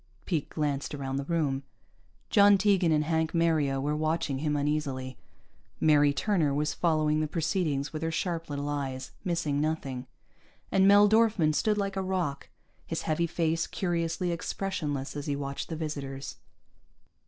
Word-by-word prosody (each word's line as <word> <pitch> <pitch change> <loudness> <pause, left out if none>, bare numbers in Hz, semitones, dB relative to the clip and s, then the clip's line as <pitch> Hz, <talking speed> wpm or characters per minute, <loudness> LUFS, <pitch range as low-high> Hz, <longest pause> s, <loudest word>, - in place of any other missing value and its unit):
Pete 160 -5 -1
glanced 145 -1 -2
around 135 -1 -3
the 140 - -3
room. 145 -5 0 0.7
John 205 -2 +7
Tegan 190 -4 +3
and 150 -1 +3
Hank 160 +1 0
Mario 155 -5 +2
were 145 +2 -1
watching 155 -3 -1
him 150 0 0
uneasily. 140 -3 -2 0.6
Mary 145 -2 +5
Turner 155 -3 +1
was 150 +1 0
following 155 -2 +1
the 155 - 0
proceedings 155 -3 -1
with 155 - -4
her 165 - -1
sharp 165 0 -2
little 145 0 -3
eyes, 135 -3 -3
missing 165 -6 0
nothing, 135 -5 -2 0.6
and 195 0 +4
Mel 205 +1 +7
Dorfman 215 -7 +3
stood 210 +8 +1
like 200 -1 -1
a - - +1
rock, 180 -7 -2 0.4
his - - -3
heavy 165 +2 0
face 165 -1 0
curiously 175 -1 -1
expressionless 160 -6 -3
as 145 0 -5
he 145 - 0
watched 140 0 -4
the 165 - -3
visitors. 140 -4 -5
155 Hz, 155 wpm, -29 LUFS, 145-170 Hz, 0.7 s, John